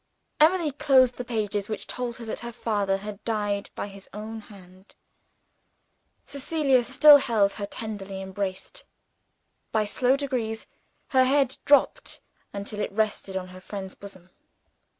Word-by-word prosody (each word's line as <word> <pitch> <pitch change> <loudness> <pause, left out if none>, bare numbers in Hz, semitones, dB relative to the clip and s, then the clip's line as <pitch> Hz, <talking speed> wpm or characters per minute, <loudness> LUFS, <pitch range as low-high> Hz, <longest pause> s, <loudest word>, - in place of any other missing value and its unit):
Emily 320 0 +4
closed 260 -3 +4
the 250 - -3
pages 210 -4 -2
which 215 - -4
told 245 -2 -4
her 235 - -8
that 220 - -4
her 235 0 -6
father 205 -4 0
had 205 +1 -8
died 205 -3 -1
by - - -3
his 200 -1 -11
own 220 +1 -6
hand. 190 -2 -16 1.3
Cecilia 280 -2 +1
still 285 +4 +8
held 220 -7 +2
her 200 - -2
tenderly 200 -3 -6
embraced. 190 - -5 0.9
By 215 -1 +1
slow 250 +5 +2
degrees, 245 -6 -3 0.4
her 260 -1 +4
head 270 -1 +2
dropped 285 -1 +3 0.3
until 205 +1 -5
it - - -2
rested 205 -2 -1
on 185 -1 -5
her 185 0 -12
friend's 190 -1 -7
bosom. 185 -3 -11
220 Hz, 140 wpm, -26 LUFS, 200-255 Hz, 1.3 s, still